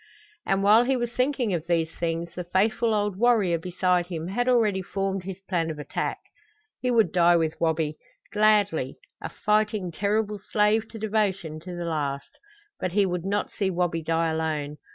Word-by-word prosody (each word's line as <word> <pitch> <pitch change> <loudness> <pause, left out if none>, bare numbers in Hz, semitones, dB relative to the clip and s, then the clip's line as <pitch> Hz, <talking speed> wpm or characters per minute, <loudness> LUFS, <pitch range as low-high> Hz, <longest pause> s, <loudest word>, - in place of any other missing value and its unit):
And 195 0 +1
while 215 +4 +6
he 265 +1 +1
was 240 -1 -2
thinking 255 -3 0
of 165 -1 -3
these 165 -2 +1
things 170 0 -3
the 180 - -5
faithful 215 +6 +1
old 205 -2 0
warrior 210 -7 +3
beside 180 0 0
him 170 -1 -5
had 245 +6 0
already 215 -6 +3
formed 195 0 -3
his 190 -1 -6
plan 175 -4 -1
of 155 - -5
attack. 145 -1 -3 0.6
He 250 - -1
would 230 -3 +3
die 175 -1 +5
with 160 -1 0
Wabi, 160 -2 0 0.4
gladly 205 -10 +2 0.2
a - - -4
fighting, 210 -3 0
terrible 210 +3 -1
slave 210 +3 +1
to 225 - -10
devotion 200 -7 -1
to 180 +2 -8
the 175 0 -4
last; 145 -4 -3 0.4
but 185 - -2
he 205 0 +4
would 180 -1 -3
not 205 +1 -1
see 195 -2 -1
Wabi 175 -2 0
die 165 0 0
alone. 155 -2 -2
185 Hz, 175 wpm, -26 LUFS, 165-210 Hz, 0.6 s, while